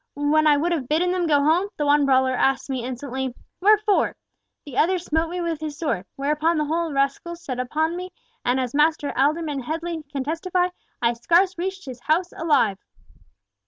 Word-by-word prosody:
When 300 +2 +2
I 295 -1 +5
would 335 +4 0
have 295 -7 -1
bidden 335 +5 +1
them 360 -2 0
go 290 -2 +3
home, 340 +7 +2
the 295 - 0
one 290 -1 +4
brawler 260 -1 +3
asks 270 +2 +1
me 255 -3 -2
insolently, 260 0 -4 0.3
'Wherefore?' 425 +1 +3 0.5
the 285 -4 -9
other 365 +7 +3
smote 325 -1 -1
me 355 +1 -3
with 335 -3 -2
his 300 -2 -5
sword, 230 - -2
whereupon 300 +4 +1
the 300 - +1
whole 325 +2 -1
rascaille 275 +5 -1
set 260 -7 -6 0.2
on 320 +2 +2
me, 365 +1 -5 0.3
and 250 +2 +1
as 250 -2 -2
Master 300 0 +2
Alderman 295 +1 +1
Headley 325 +5 -4
can 275 -2 -2
testify, 355 +4 0 0.3
I 235 0 +3
scarce 345 +10 +2
reached 380 +2 -4
his 255 -3 -8
house 330 +7 0
alive. 230 - +2
305 Hz, 185 wpm, -23 LUFS, 275-340 Hz, 0.5 s, I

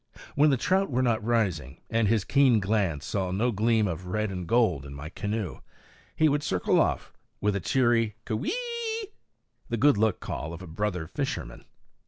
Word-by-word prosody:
When 150 +2 +4
the 135 - +3
trout 190 +9 +1
were 130 -1 +1
not 115 -3 +1
rising, 95 - -1
and 115 -1 +1
his 110 -2 +2
keen 135 -3 +4
glance 95 -7 0
saw 95 -3 -1
no 110 +7 +1
gleam 110 0 +2
of 90 +1 -5
red 105 +2 -1
and 90 -2 -5
gold 110 - +2
in 70 0 -9
my 75 +2 -7
canoe, 105 +1 -4 0.6
he 155 - +4
would 145 0 +1
circle 95 -11 +1
off - - -1 0.3
with 105 0 +1
a - - 0
cheery 115 0 +2
K'weee! 460 - -3 0.6
the 115 - -1
good 135 -2 +4
luck 110 -3 +2
call 80 +3 -5
of 85 - -8
a - - -9
brother 90 0 -2
fisherman. 110 - -4
110 Hz, 180 wpm, -27 LUFS, 90-125 Hz, 0.6 s, When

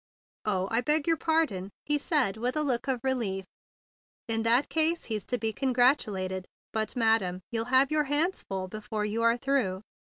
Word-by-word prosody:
"Oh, 190 -3 0
I 230 +1 +2
beg 300 +3 +2
your 330 - +3
pardon!" 315 - 0 0.2
he 295 0 +1
said 285 - +2
with 245 +4 -2
a 305 - +2
look 260 -2 -1
of 255 -3 -1
relief. 225 -8 -1 0.8
"In 225 -1 +1
that 235 +4 +3
case 325 +1 +2
he's 215 -3 -4
to 245 - 0
be 225 -1 -2
congratulated. 215 -8 +1 0.3
But, 220 +2 -1
madam, 220 -6 +1
you'll 225 -1 -1
have 260 +3 +4
your 305 -1 +2
hands 300 +7 +1
full 190 -1 -5
before 210 +1 -4
you 215 +2 -2
are 230 +1 +3
through. 240 -8 -1
235 Hz, 180 wpm, -28 LUFS, 210-275 Hz, 0.8 s, have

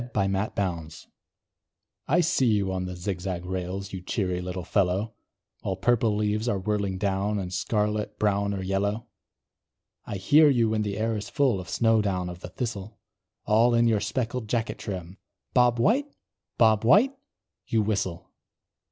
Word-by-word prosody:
BOB 95 -1 +1
WHITE 90 -5 -3 1.0
I 170 +6 +4
see 165 -6 +2
you 100 -4 +2
on 90 0 -2
the 90 0 -5
zig 90 0 -4
zag 90 -1 -4
rails, 95 +1 -4
You 95 - -5
cheery 90 -1 -2
little 90 0 -5
fellow! 100 +3 0 0.5
While 95 - -2
purple 110 +2 +2
leaves 105 +2 0
are 100 - +1
whirling 100 -1 -1
down, 100 +1 0
And 95 -2 -4
scarlet, 105 +1 -1
brown 100 -1 +1
or 95 - -4
yellow. 100 +4 -1 1.0
I 105 - -5
hear 145 +11 +5
you 120 -5 +3
when 110 -1 +1
the 105 -1 -2
air 110 +1 0
is 105 - -5
full 135 -9 +2
Of 90 0 -8
snow 115 +2 +3
down 90 -3 -1
of 90 - -10
the 90 - -8
thistle; 105 -1 -5 0.5
All 115 +3 +4
in 115 0 +4
your 110 -2 +3
speckled 115 +1 -2
jacket 115 0 -2
trim, 95 -1 -6 0.3
"Bob 125 -1 +4
White! 240 - +2 0.5
Bob 110 -2 +4
White!" 215 - +5 0.5
you 110 -2 +2
whistle. 95 -4 -2
105 Hz, 160 wpm, -26 LUFS, 95-115 Hz, 1.0 s, hear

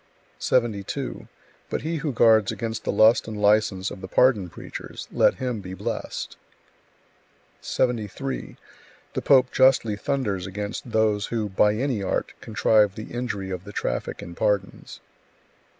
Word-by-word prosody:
72. 110 -6 -1 0.4
But - - -3
he 165 +1 -2
who 150 -1 -2
guards 110 -4 +4
against 115 -1 -4
the - - +1
lust 110 +4 +5
and 110 -2 -5
license 105 -2 +2
of 95 - -9
the 95 - -6
pardon 105 -3 +3
preachers, - - -8
let - - +3
him 125 -5 -3
be 95 0 -7
blessed! - - -5 1.2
73. 125 +2 -2 0.6
The - - -2
pope 130 -2 +4
justly 130 -5 +4
thunders 105 -7 -2
against 105 +5 -5
those 110 -2 +2
who, 110 -3 -2
by 105 +2 +3
any 125 -2 -1
art, 95 - -2
contrive 105 -2 +3
the 110 - -8
injury 105 -6 -3
of 90 -1 -4
the 100 - -9
traffic - - -3
in 85 - -8
pardons. 105 +1 -2
110 Hz, 140 wpm, -25 LUFS, 100-120 Hz, 1.2 s, lust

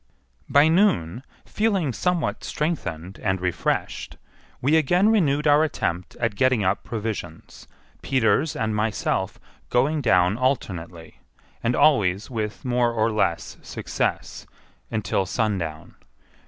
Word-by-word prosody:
By 145 +2 +5
noon, 130 - +2 0.2
feeling 195 - 0
somewhat 180 +5 -1
strengthened 95 - -3
and 95 0 0
refreshed, 90 -1 -2 0.4
we 145 +5 +2
again 175 +7 +3
renewed 150 -9 +2
our 150 +1 +5
attempt 90 - -3
at 115 -2 -1
getting 130 +1 +2
up 95 +2 0
provisions, 110 -7 -6 0.3
Peters 135 +4 +1
and 110 -2 -1
myself 105 0 -1 0.3
going 145 +5 +2
down 95 -3 +3
alternately, 90 -11 -3 0.4
and 120 +2 0
always 105 -6 +3
with 110 -1 -4
more 120 -1 +2
or 115 0 +1
less 105 -6 -1
success, - - -3 0.4
until 95 -3 -1
sundown. 90 -9 -2
115 Hz, 115 wpm, -24 LUFS, 95-145 Hz, 0.4 s, By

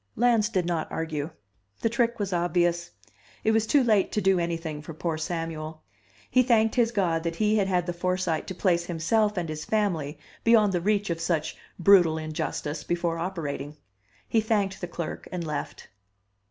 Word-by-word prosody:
Lans 230 -2 +3
did 185 -6 0
not 170 -2 -2
argue. 155 -2 -3 0.5
The - - +2
trick 235 0 +1
was 200 -3 -2
obvious; 175 0 +1 0.5
it 220 - +3
was 220 0 +2
too 285 +1 +4
late 215 -5 +3
to - - +1
do 190 -2 +3
anything 165 -3 -3
for 155 +1 -9
poor 165 0 -2
Samuel. 160 -1 -4 0.4
He 255 - +4
thanked 225 -3 +3
his 235 -2 +3
God 175 -7 +1
that 165 0 -3
he 215 +3 +2
had 200 -2 +2
had 180 -2 +1
the 175 - -2
foresight 180 -2 -1
to 190 - -5
place 175 -2 +1
himself 200 +5 +1
and 175 -2 -1
his 155 -1 -5
family 170 -9 -1 0.3
beyond 220 -4 +5
the 175 - 0
reach 205 0 +1
of 165 0 -3
such 160 -3 -1 0.2
brutal 175 -3 +5
injustice 155 -1 -3
before 170 -1 -1
operating. 150 -5 -4 0.5
He 225 - +2
thanked 205 -3 0
the 180 - -3
clerk 170 -1 -5
and 180 -2 -3
left. 150 -2 -5
175 Hz, 180 wpm, -27 LUFS, 165-210 Hz, 0.5 s, beyond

